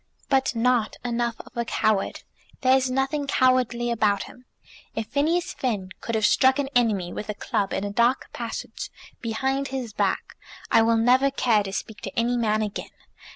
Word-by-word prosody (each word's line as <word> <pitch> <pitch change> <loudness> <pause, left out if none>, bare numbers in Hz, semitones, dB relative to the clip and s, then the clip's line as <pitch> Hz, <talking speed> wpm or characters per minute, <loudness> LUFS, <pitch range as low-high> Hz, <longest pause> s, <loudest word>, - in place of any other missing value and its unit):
"But 270 -2 +2
not 235 -1 +2
enough 235 -1 -1
of - - -18
a 235 - 0
coward. 215 -3 0 0.4
There 260 -1 +5
is 260 -1 +2
nothing 270 +3 0
cowardly 250 -3 +2
about 210 -3 +2
him. 250 - -14 0.5
If 225 - -2
Phineas 330 +5 +1
Finn 210 -8 -2
could 230 - -3
have 215 -1 +2
struck 260 +4 +4
an 280 -1 -1
enemy 210 -7 +2
with 210 - -6
a 210 - -2
club, 200 -1 -1
in - - -1
a 205 - -3
dark 240 +4 +1
passage, - - -5 0.3
behind 265 +4 -1
his 260 -5 -5
back, - - -1 0.4
I 230 - +6
will 225 0 +3
never 255 +4 +4
care 240 -5 +2
to 195 -1 -5
speak 210 +2 -5
to 195 - -7
any 240 +1 +1
man 215 -2 +1
again. 205 -1 -5
240 Hz, 180 wpm, -25 LUFS, 215-260 Hz, 0.5 s, I